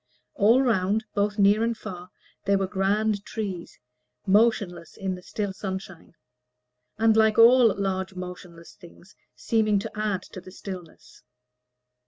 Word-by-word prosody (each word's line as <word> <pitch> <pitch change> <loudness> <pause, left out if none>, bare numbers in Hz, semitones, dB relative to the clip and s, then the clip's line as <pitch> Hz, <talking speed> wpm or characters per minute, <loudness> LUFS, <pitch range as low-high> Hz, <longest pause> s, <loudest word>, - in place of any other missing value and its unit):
All 250 0 +4
round, 215 -2 +1
both 205 +1 0
near 205 +2 +4
and 230 0 -1
far, 180 -4 -9 0.4
there 200 0 +3
were 195 - 0
grand 200 +2 0
trees, 195 -7 -6 0.5
motionless 195 -5 +1
in 190 -1 -3
the 180 - -8
still 200 +1 -4
sunshine, 190 -3 -7 0.8
and, 220 0 +3
like 220 -1 +3
all 235 0 +7
large 190 -1 -3
motionless 180 -2 -9
things, 180 0 -17 0.2
seemed 215 -3 +1
to - - -6
add 210 -3 -2
to 185 - -11
the 185 - -13
stillness. 185 -3 -10
200 Hz, 135 wpm, -25 LUFS, 185-215 Hz, 0.8 s, all